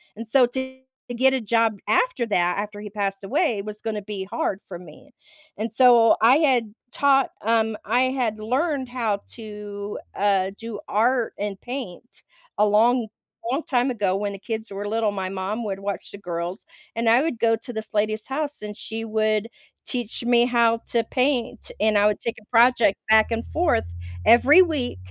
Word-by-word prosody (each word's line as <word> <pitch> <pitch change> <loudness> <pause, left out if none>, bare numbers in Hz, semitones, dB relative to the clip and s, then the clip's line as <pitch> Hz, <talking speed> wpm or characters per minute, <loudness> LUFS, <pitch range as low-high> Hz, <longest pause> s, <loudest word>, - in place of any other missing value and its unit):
and 230 +1 -8
so 255 +2 +5
to 260 +1 -6 0.3
get 265 +2 +3
a - - 0
job 225 0 +1
after - - +1
that, 180 -5 +1
after 205 0 -4
he 210 - -7
passed 195 -1 -3
away, 235 - 0
was 210 +1 -8
gonna 215 -2 -4
to 195 - -20
be 205 -3 -5
hard 190 0 -3
for 175 -3 -8
me, 180 - -15 0.5
and 220 +2 -3
so 235 -1 +6
I 245 +6 +6
had 250 -9 +2 0.2
taught, 275 -1 +3
um 225 0 +1
I 245 +5 +2
had 240 -5 -2
learned 260 +4 -1
how 230 -5 -1 0.2
to, 210 -2 -7 0.2
uh, 195 -2 +1
do 225 -2 -7
art 235 +3 +1
and 200 -1 -4
paint 245 -4 -8 0.3
a 210 - +4
long, 225 +3 +3 0.4
long 275 +5 0
time 250 0 +1
ago 200 -6 0
when 200 +1 -2
the 195 - -8
kids 220 +2 -5
were 200 +1 -5
little, 220 -1 0
my 190 -2 -4
mom 195 +4 -3
would 195 -2 -3
watch 200 0 -5
the 200 - -9
girls, 175 0 -5 0.3
and 230 0 -1
I 235 +3 +5
would 305 -6 -2
go 225 0 +3
to 245 +3 -10
this 220 0 -7
lady's 215 +1 0
house, 290 -2 -4
and 210 0 -6
she 225 +1 -6
would 215 0 0 0.4
teach 245 -2 -5
me 240 0 +4
how 235 -2 +3 0.2
to 235 - +2
paint, 250 -3 -1
and 215 -1 +3
I 205 - +4
would 210 - 0
take 235 0 -4
a - - -23
project 235 -3 +4
back 220 0 +5
and 230 0 -2
forth 310 - 0 0.3
every 290 +10 +7
week 300 - -3
225 Hz, 185 wpm, -23 LUFS, 205-245 Hz, 0.5 s, every